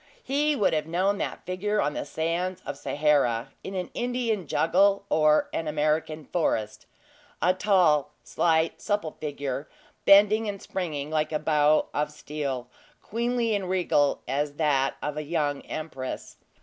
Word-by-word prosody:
He 295 +3 +1
would 205 -9 +2
have 155 0 0
known 190 +4 +1
that - - -4
figure 205 +3 -1
on 145 -4 +1
the - - -4
sands 170 +4 -2
of 145 - -4
Sahara, 140 -4 +1
in 190 - -6
an 180 -1 -3
Indian 240 -6 -1
jungle, 195 +4 +3
or 155 -1 +4
an 165 - -2
American 155 0 0
forest 110 -11 -1 0.5
a 180 +2 +3
tall, 180 -7 +3
slight, 160 -1 +1
supple 205 -7 -1
figure, 145 -2 -4 0.4
bending 210 +2 +6
and 200 -1 -5
springing 155 -7 -4
like 155 0 0
a 155 - +1
bow 150 0 +3
of 150 0 -1
steel, 145 -4 -4 0.4
queenly 235 0 0
and 195 -3 -2
regal 175 -6 +1
as 145 +3 -1
that 145 -3 +1
of 150 0 -3
a 155 - -2
young 145 -2 -1
empress. 145 -5 -6
160 Hz, 150 wpm, -26 LUFS, 150-195 Hz, 0.5 s, bending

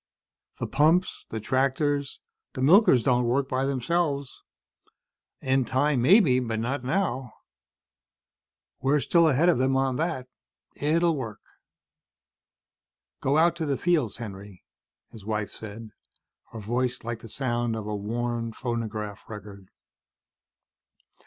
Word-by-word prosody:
The - - -2
pumps, 160 +6 +2
the 110 - -4
tractors, 140 +4 0 0.3
the 130 - -3
milkers 155 - +6
don't 125 -2 +2
work 135 +3 +1
by 130 0 -1
themselves. 140 +1 -1 1.0
In 130 0 +2
time, 130 +2 +1
maybe. 150 - +5
Not 120 +3 -2
now. 135 - -1 1.5
We're 140 +3 +2
still 170 +3 +3
ahead 150 +5 +3
of 175 -8 +4
them 135 +1 +2
on 135 -1 0
that. 155 -6 -2 0.5
It'll 165 +3 +1
work." 115 -7 -6 1.8
"Go 140 +3 +2
out 170 +1 +4
to 160 -2 -2
the 140 -2 0
fields, 160 - +1
Henry," 100 -4 -9 0.5
his 110 - -12
wife 105 0 -3
said, 110 0 -9 0.6
her 115 - -7
voice 125 +4 -2
like 115 -1 -4
the 115 - -12
sound 120 -1 -1
of 110 -2 -5
a 105 0 -3
worn 115 +2 -3
phonograph 110 -5 -5
record. 100 -3 -10
130 Hz, 120 wpm, -26 LUFS, 115-145 Hz, 1.8 s, milkers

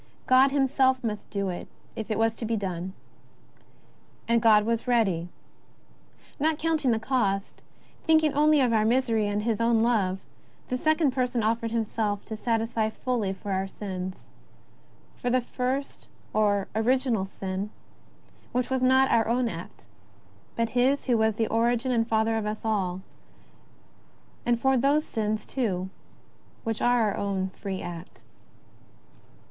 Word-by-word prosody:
God 260 +2 +6
him 275 0 +2
self 260 -1 +2
must 210 -3 -4
do 200 -2 -2
it 175 - -5 0.3
if 220 - -5
it 215 - 0
was 225 0 +2
to - - -7
be 225 +1 0
done. 185 -2 -4 1.3
And 235 0 +3
God 215 -2 +5
was 230 +2 -1
ready. 195 -8 +1 1.1
Not 310 +1 +1
counting 315 -4 0
the 225 - +3
cost, 220 -5 -1 0.5
thinking 315 -2 +4
only 300 0 +4
of 245 -3 +2
our 215 -1 +3
misery 230 -2 +2
and 205 0 -1
of - - -6
His 225 -1 0
own 230 -1 +3
love, 205 -6 +1 0.5
the 255 - 0
Second 310 -1 +2
Person 250 -2 0
offered 230 +1 0
Himself 220 -2 -2
to 220 - -5
satisfy 225 0 0
fully 220 -3 -2
for 195 +1 -6
our 190 0 0
sins 185 -2 -6 0.5
— - - -31
for 245 - 0
the 255 +1 +3
first 255 +3 -3 0.3
or 205 -2 +2
original 235 -1 +1
sin, 190 +1 -4 0.8
which 250 +1 -1
was 260 -1 +1
not 260 +1 +4
our 225 -2 +3
own 240 +1 +1
act, 170 -5 -8 0.7
but 230 -1 0
his 255 +4 +2
who 245 - +2
was 220 -1 +2
the 225 - +1
origin 235 +3 +1
and 230 -2 +1
father 225 0 +1
of 215 -1 -2
us 215 +1 -5
all, 190 -4 -1 1.4
and 240 -1 +2
for 265 +1 +3
those 285 +4 +2
sins, 215 -1 -2
too, 190 -8 -2 0.7
which 225 -1 -3
are 245 0 +3
our 210 -2 0
own 195 -2 -2
free 190 -1 -5
act. 170 0 -9
225 Hz, 155 wpm, -27 LUFS, 205-255 Hz, 1.4 s, God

